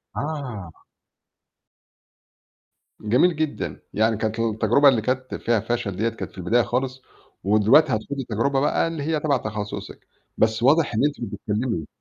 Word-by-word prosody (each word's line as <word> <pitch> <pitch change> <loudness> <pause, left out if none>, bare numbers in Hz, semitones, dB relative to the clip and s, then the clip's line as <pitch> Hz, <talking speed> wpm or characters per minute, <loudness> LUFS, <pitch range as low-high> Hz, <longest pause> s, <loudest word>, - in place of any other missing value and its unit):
آه. 130 - -5 2.3
جميل 125 +11 +3
جدًا. 155 -1 -3
يعني 110 0 +2
كانت 110 +1 -2
التجربة 115 +5 +4
اللي 120 -4 +2
كانت 130 +3 -2
فيها 115 -1 +1
فَشَل 115 -3 -2
ديّة 110 +4 0
كانت 115 - -7
في - - -20
البداية 115 +7 +2
خالص، 130 +1 -2 0.4
ودلوقتي 110 +9 +5
هتخوضي 135 +5 -3
تجربة 125 +5 +1
بقى 145 +3 +1
اللي 165 -3 -4
هي 155 +1 0
تَبَع 145 -2 +1
تخصِّصِك، 105 -3 -6 0.3
بس 110 +1 +1
واضح 145 +1 +4
إن 110 - 0
أنتِ 145 0 -1
مش 115 - -4
بتكمّلي. 105 - -3
120 Hz, 145 wpm, -23 LUFS, 110-140 Hz, 2.3 s, ودلوقتي